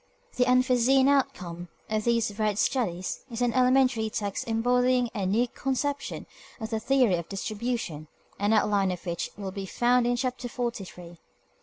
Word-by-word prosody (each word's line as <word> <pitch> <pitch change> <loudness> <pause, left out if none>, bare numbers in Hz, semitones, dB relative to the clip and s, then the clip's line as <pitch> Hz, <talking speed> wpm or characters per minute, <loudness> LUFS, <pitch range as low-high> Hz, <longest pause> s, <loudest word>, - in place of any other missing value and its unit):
The 250 0 +2
unforeseen 255 +1 +4
outcome 180 -11 0 0.2
of 215 -1 -1
these 230 -2 +2
varied 210 0 -1
studies 185 -8 -1
is 240 0 -2
an 240 -1 +1
elementary 255 -3 +3
text 205 -1 -3
embodying 245 +1 +2
a 200 -5 -2
new 225 +6 +2
conception 275 +3 -3 0.3
of 220 0 -5
the 220 - 0
theory 250 -6 +3
of 170 - -6
distribution, 205 -6 -4 0.3
an 205 +1 +1
outline 205 -3 +3
of 180 0 -6
which 170 -1 -3
will 195 -2 -5
be 195 0 -6
found 245 +3 +2
in 245 - +2
Chapter 250 0 -3
Forty 235 -5 -3
three. 175 -2 -12
230 Hz, 160 wpm, -27 LUFS, 200-250 Hz, 0.3 s, unforeseen